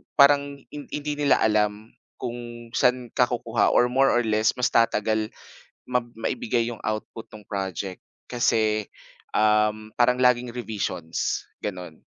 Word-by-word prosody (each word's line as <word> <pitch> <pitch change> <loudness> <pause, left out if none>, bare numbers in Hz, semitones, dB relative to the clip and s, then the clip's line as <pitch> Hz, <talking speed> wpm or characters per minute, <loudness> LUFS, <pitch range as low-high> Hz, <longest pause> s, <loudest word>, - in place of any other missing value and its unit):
parang 140 -1 +4
hin 145 -1 -8
hindi 150 0 -4
nila 145 -5 +3
alam, 105 0 +1 0.2
kung 120 -1 -7
saan 125 -2 +1
ka 125 - +3
kukuha 120 -2 +1
or 125 0 +4
more 135 +1 +4
or 120 -2 +3
less 110 0 +2
mas 125 - 0
tatagal 110 -1 +2 0.6
mab 125 -1 -1
maibigay 115 +1 -1
yong 115 - -8
output 110 +1 -5
no'ng 105 -1 -13
project 95 -2 -4 0.3
kasi, 110 -3 +1 0.5
um, 105 0 +2
parang 125 +1 +5
laging 125 -1 +3
revisions, 100 -8 -3 0.2
gano'n. 90 -5 -6
115 Hz, 135 wpm, -25 LUFS, 105-125 Hz, 0.6 s, parang